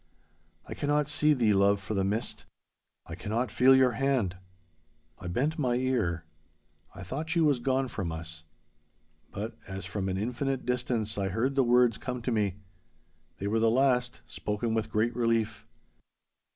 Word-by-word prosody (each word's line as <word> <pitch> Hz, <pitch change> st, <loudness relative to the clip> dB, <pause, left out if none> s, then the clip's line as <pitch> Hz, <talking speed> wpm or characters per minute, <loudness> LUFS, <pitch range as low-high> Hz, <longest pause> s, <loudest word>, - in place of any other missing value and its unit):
I -, -, -5 dB
cannot 145 Hz, 0 st, 0 dB
see 150 Hz, 0 st, +3 dB
thee, 115 Hz, -5 st, +3 dB
love, 100 Hz, +1 st, +4 dB
for 100 Hz, +2 st, -5 dB
the 95 Hz, -2 st, +1 dB
mist. 105 Hz, +5 st, -2 dB, 0.6 s
I 80 Hz, -, -8 dB
cannot 110 Hz, +6 st, -2 dB
feel 130 Hz, +1 st, +6 dB
your 130 Hz, -1 st, +5 dB
hand.' 120 Hz, -7 st, 0 dB, 0.8 s
I -, -, -7 dB
bent 140 Hz, -, -1 dB
my 125 Hz, -4 st, +1 dB
ear. 115 Hz, -10 st, 0 dB, 0.7 s
I 95 Hz, -, -8 dB
thought 145 Hz, -, -5 dB
she 170 Hz, -, +1 dB
was 150 Hz, -5 st, +3 dB
gone 130 Hz, +1 st, 0 dB
from 100 Hz, -8 st, -4 dB
us. 80 Hz, 0 st, -7 dB, 0.9 s
But, -, -, -6 dB
as 95 Hz, 0 st, -6 dB
from 95 Hz, -2 st, -3 dB
an 95 Hz, -, -1 dB
infinite 125 Hz, +5 st, -2 dB
distance 120 Hz, -4 st, -1 dB
I 95 Hz, -, 0 dB
heard 120 Hz, +8 st, 0 dB
the 135 Hz, -1 st, +3 dB
words 120 Hz, -2 st, +4 dB
come 125 Hz, -2 st, -5 dB
to 125 Hz, -, -1 dB
me. 105 Hz, -5 st, +1 dB, 0.8 s
They 100 Hz, -, -5 dB
were 110 Hz, +3 st, +1 dB
the 115 Hz, 0 st, +4 dB
last, 125 Hz, 0 st, +1 dB
spoken 105 Hz, +2 st, -3 dB
with 110 Hz, -1 st, -1 dB
great 115 Hz, +2 st, +1 dB
relief. 115 Hz, -2 st, 0 dB
120 Hz, 165 wpm, -29 LUFS, 100-130 Hz, 0.9 s, feel